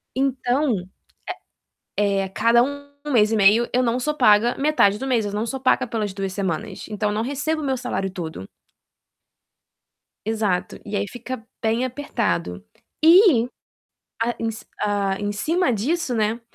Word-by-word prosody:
Então, 265 +1 +1 1.2
eh 200 -1 +2
eh, - - -1
a - - -7
cada 230 +4 +4
1 285 +2 -5 0.2
mês 215 -4 +4
e - - +2
meio, 215 +4 +5
eu 250 +1 +3
não 240 +1 +1
sou 300 +4 -1
paga 235 -3 +4
metade 275 -9 +3
do 265 - -4
mês, 240 -5 +1
eu 205 - -3
não 210 +2 -1
sou 265 +4 -3
paga 255 - +2
pelas 210 -4 -2
2 195 -1 -4
semanas, 190 -5 -3
então 210 0 -1
eu 205 - -2
não 220 - 0
recebo 290 +5 -2
o - - -4
meu 265 -1 0
salário 240 -6 -3
todo. 160 - -6 1.8
Exato. 210 -4 -1
E 205 0 -4
aí 200 - -1
fica 245 0 -7 0.2
bem 225 +2 +1
apertado. 90 - -2 0.4
E 325 - +7 0.7
a 235 +1 0
em 225 0 -1
c 220 - -11 0.2
hã, 200 -2 0
em 205 0 -2
cima 315 - +1
disso, 255 +6 -1
né, 220 +1 0
230 Hz, 165 wpm, -23 LUFS, 205-260 Hz, 1.8 s, E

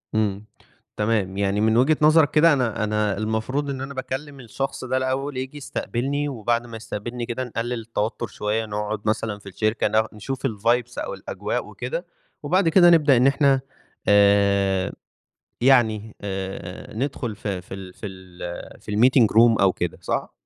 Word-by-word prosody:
إمم، 105 -1 0 0.5
تمام، 105 -3 0
يعني 100 +1 +1
من 110 +1 +3
وجهِة 140 +5 +4
نظرك 155 0 +5
كده 160 +1 +5
أنا، 120 -6 0
أنا 105 -1 0
المفروض 110 +7 -2
إن 135 -1 -4
أنا 140 +1 -5
باكلم 135 +2 -5
الشخص 135 +3 -4
ده 130 +1 0
الأول، 130 +1 -2
ييجي 130 +3 -5
يستقبلني، 140 +1 -2
وبعد 120 -1 -1
ما 115 -1 -7
يستقبلني 120 +2 -5
كده 120 +2 -3
نقلِّل 120 0 -3
التوتر 115 +1 -3
شوية، 105 +2 -2
نقعد 105 0 -3
مثلًا 105 -1 -1
في 100 -1 -11
الشركة، 110 +3 0
نا 110 +1 +2
نشوف 135 +5 -3
الvibes 120 +2 0
أو - - -3
الأجواء - - -4
وكده. - - -5 0.4
وبعد 185 -2 +2
كده 175 +1 +7
نبدأ 150 -6 +5
إن 125 +3 +5
إحنا 135 -1 +3 0.5
آآ، 100 -2 +4 0.7
يعني 110 -4 +3
آآ، 95 -1 -6
ندخُل 120 -4 -3
ف 110 - -6
في 95 -1 -5
ال 95 -1 -9
في 105 - -7
ال 90 -2 -9
في - - -7
الmeeting 125 +3 +5
room 115 -1 +6
أو 95 -1 +4
كده، 90 - -3
صح؟ - - -2
115 Hz, 160 wpm, -23 LUFS, 105-130 Hz, 0.7 s, كده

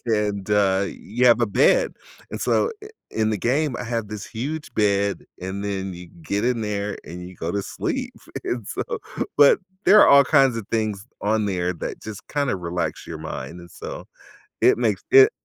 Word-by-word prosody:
and 105 -3 0
uh, 100 -1 +3
you 120 +5 -1
have 120 -1 +6
a 120 - +3
bed. - - +3 0.4
And - - -5
so, 470 - +2
i - - -9 0.2
in 110 0 0
the 105 - -1
game, 130 - +1
I - - -4
have 115 -2 -3
this 105 -1 -6
huge 145 +7 -5
bed 100 -1 +1 0.2
and 95 +2 -4
then 95 -2 -3
you 90 0 -10
get 100 +7 -1
in 120 -2 +1
there 105 -1 -2
and 90 +1 -8
you 90 - -13
go 80 - -3
to 100 -1 -1
sleep. - - -3 0.3
And 120 -4 -3
so - - -2 0.6
But, 145 -1 +7 0.3
there 210 +3 +8
are - - +7
all 140 0 +8
kinds 135 -4 +4
of 110 - -5
things 110 -3 -1 0.2
on 110 0 +1
there 90 -2 0
that - - -6
just 110 -2 -8
kinda 145 -6 0
relax 85 -1 -3
your - - -6
mind, 65 +7 -6
and 85 - -13
so - - -8 0.6
it - - +6
makes 110 -5 0
it 405 +2 +9
105 Hz, 195 wpm, -23 LUFS, 95-120 Hz, 0.6 s, it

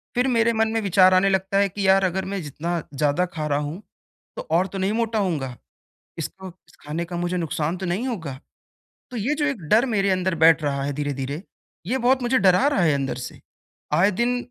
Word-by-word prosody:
फिर 250 +2 +2
मेरे 230 -2 +2
मन 225 0 +2
में 225 - 0
विचार 185 -1 +5
आने 190 +2 +4
लगता 190 +1 0
है 200 0 +4
कि, 195 +1 -2
"यार, 195 0 +5
अगर 190 +1 -1
मैं 195 -1 -3
जितना 165 +4 -3
ज़्यादा 145 +5 +1
खा 155 -2 -3
रहा 145 -1 +1
हूँ, 150 +7 -5 0.5
तो - - -7
और 180 +3 +3
तो 195 - -7
नहीं 190 +2 0
मोटा 225 -1 0
होऊँगा? 145 -10 -2 0.6
इसको 190 +4 -6 0.3
खाने 160 +3 -4
का 175 0 -6
मुझे 175 +1 -1
नुकसान 165 +1 -2
तो 190 - -5
नहीं 195 +9 -1
होगा?" 160 - -5 0.7
तो 250 - -7
ये 245 +8 0
जो 295 -1 -1
एक 275 -10 -2
डर 230 +5 +4
मेरे 200 -4 +1
अंदर 185 -1 0
बैठ 165 -1 +6
रहा 140 -1 -1
है 145 - -2
धीरे-धीरे, 145 +2 -4 0.4
ये 260 +5 0
बहुत 255 +1 +2
मुझे 255 +2 +2
डरा 190 +6 +4
रहा 285 - +1
है 155 -4 +3
अंदर 135 -2 -2
से। - - -11 0.5
आए 195 +4 +4
दिन 240 +5 0
185 Hz, 215 wpm, -23 LUFS, 160-215 Hz, 0.7 s, बैठ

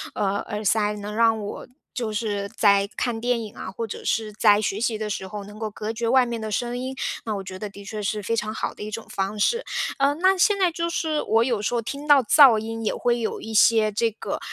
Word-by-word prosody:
呃， 200 -1 0
耳 210 -1 -4
塞， 210 +1 +2
能 205 +1 -6
让 225 -1 +3
我 205 -1 -6 0.3
就 230 -4 -3
是 205 -2 -2
在 200 -1 +4
看 235 -3 -2
电 245 0 +1
影 210 - -10
啊， - - -6
或 230 +4 -4
者 220 - -7
是 215 -1 -1
在 210 -1 +4
学 205 -1 -1
习 230 -2 0
的 215 0 -3
时 195 -2 -4
候， 205 +1 -6
能 205 +1 -12
够 220 -1 -3
隔 215 +1 -5
绝 230 +1 -2
外 260 0 +5
面 235 -2 -4
的 220 - -4
声 240 +3 -2
音， 260 +1 -4 0.3
那 220 -2 -2
我 195 - -5
觉 185 0 -8
得 210 - -5
的 200 0 -12
确 215 +1 -5
是 210 +1 -2
非 230 +3 0
常 215 -1 -2
好 220 - -3
的 - - -13
一 210 - -5
种 225 +1 -6
方 195 +2 -3
式。 470 - +2 0.4
呃， 280 +1 +3
那 375 +4 +3
现 400 +2 +3
在 370 -3 +2
就 335 +1 -2
是 315 -3 -1
我 225 +1 +2
有 235 -4 0
时 240 - -1
候 - - +2
听 280 +6 -6
到 285 -3 +6
噪 260 -1 +7
音， 225 +1 -4
也 215 - +1
会 240 0 +1
有 225 - -3
一 220 - -7
些 220 0 +5
这 225 +3 +1
个 215 - -5
220 Hz, 275 characters per minute, -24 LUFS, 210-240 Hz, 0.4 s, 噪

